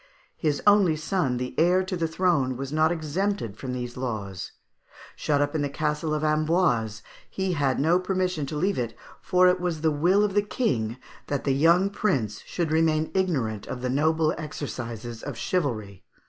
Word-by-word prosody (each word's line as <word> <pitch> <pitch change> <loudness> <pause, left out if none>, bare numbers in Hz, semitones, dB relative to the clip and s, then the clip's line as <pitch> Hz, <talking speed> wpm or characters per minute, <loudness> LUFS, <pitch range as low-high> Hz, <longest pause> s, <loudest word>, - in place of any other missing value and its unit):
His 150 -3 -1
only 200 -5 +5
son, 155 -5 -1
the 125 +1 -4
heir 180 +3 +4
to 185 0 -3
the 165 -2 0
throne, 160 -7 +1
was 135 +2 -5
not 155 +2 +3
exempted 170 - -2
from 130 +3 -6
these 125 -1 -4
laws. 100 -7 -4 0.6
Shut 145 -1 +1
up 145 0 0
in 155 - 0
the 145 - -1
Castle 155 +2 -1
of 150 - -2
Amboise, 155 - +1 0.3
he 190 -1 -1
had 140 -5 +1
no 165 +5 +3
permission 185 -5 -1
to 150 - -5
leave 185 +4 0
it, 115 -2 -3 0.2
for 185 -1 +4
it 180 0 +3
was 175 -3 -2
the 160 -1 +3
will 175 +8 +3
of 205 -2 0
the 205 - +4
King 125 - -1 0.3
that 145 - -2
the 135 - +2
young 170 +7 +4
prince 130 - -1
should 170 -3 -2
remain 160 -1 +2
ignorant 135 - -1
of 125 - -5
the 125 - 0
noble 155 +3 +2
exercises 120 -7 -6
of 140 -4 -6
chivalry. 110 - -2
155 Hz, 180 wpm, -26 LUFS, 125-180 Hz, 0.6 s, only